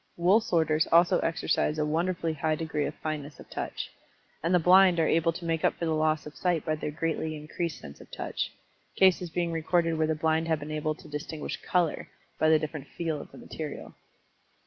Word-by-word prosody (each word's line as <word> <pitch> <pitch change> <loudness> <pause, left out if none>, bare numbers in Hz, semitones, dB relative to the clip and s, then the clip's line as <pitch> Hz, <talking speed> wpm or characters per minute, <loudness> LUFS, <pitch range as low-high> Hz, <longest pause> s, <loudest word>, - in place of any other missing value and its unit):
Wool 180 +5 +5
sorters 160 -6 +2
also 175 +2 +5
exercise 160 -1 0
a 150 - +1
wonderfully 165 +1 0
high 155 +1 0
degree 155 -2 -2
of - - -4
fineness 150 -2 -5
of - - -12
touch. - - -4 0.5
And 165 - 0
the 180 - +6
blind 180 +1 +6
are 160 - +4
able 165 +1 +3
to 170 +1 -7
make 165 -1 -1
up - - +3
for 170 - -3
the 160 - +1
loss 155 0 +1
of 150 - -9
sight 175 -4 0
by 155 - +1
their 155 0 -3
greatly 160 +1 -2
increased 155 +1 -4
sense 70 -1 -11
of - - -15
Touch, - - -3 0.4
cases 185 -2 +4
being 170 0 -1
recorded 165 +1 +1
where 155 - +2
the 160 - +1
blind 160 +1 +1
have 160 -2 +1
been 150 +1 -7
able 155 0 -1
to - - -15
distinguish 150 +1 -5
color 175 -3 0 0.3
by 155 - +4
the 160 - +6
different 150 -2 -5
"feel" 160 -4 -3
of - - -12
the - - -13
material. 155 -3 -7
160 Hz, 210 wpm, -28 LUFS, 155-170 Hz, 0.5 s, the